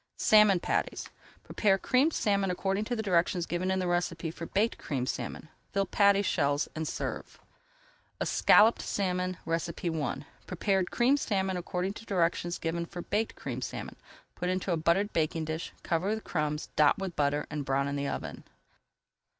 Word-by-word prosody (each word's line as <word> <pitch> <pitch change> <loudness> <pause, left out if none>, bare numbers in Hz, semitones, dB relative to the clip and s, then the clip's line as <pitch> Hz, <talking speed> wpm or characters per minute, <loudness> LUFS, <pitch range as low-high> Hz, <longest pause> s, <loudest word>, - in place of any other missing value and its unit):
SALMON 210 -3 +6
PATTIES - - -2 0.3
Prepare 195 -3 +2
Creamed 260 +9 +2
Salmon 200 -7 +1
according 195 +3 -1
to 245 - -2
directions 180 -4 +1
given 175 +2 -2
in 190 - +1
the 185 - -1
recipe 175 -2 -1
for 170 0 -7
Baked 215 +4 0
Creamed 130 -3 -3
Salmon. 155 - -4 0.3
Fill 195 0 +1
patty 200 0 +4
shells 145 -5 +1
and 160 0 -3
serve. - - -5 0.8
ESCALLOPED 220 +3 +5
SALMON 185 -2 -1
I 165 -3 -2 0.2
Prepare 190 +1 +1
Creamed 255 +8 +2
Salmon 190 -6 0
according 180 +2 -2
to 225 - -11
directions 175 -2 0
given 170 +1 -3
for 175 -1 -7
Baked 215 +2 -1
Creamed - - -5
Salmon. - - -6 0.4
Put 180 - -3
into 185 0 -1
a - - +3
buttered 170 +6 +1
baking 160 0 0
dish, 160 +1 -4
cover 170 +2 0
with 220 +1 -1
crumbs, 150 -2 -2
dot 150 -1 +5
with 190 -3 -4
butter, 145 0 +1
and 150 -1 -3
brown 135 +1 0
in 140 - -2
the 140 0 -2
oven. - - -5
180 Hz, 160 wpm, -29 LUFS, 160-200 Hz, 0.8 s, SALMON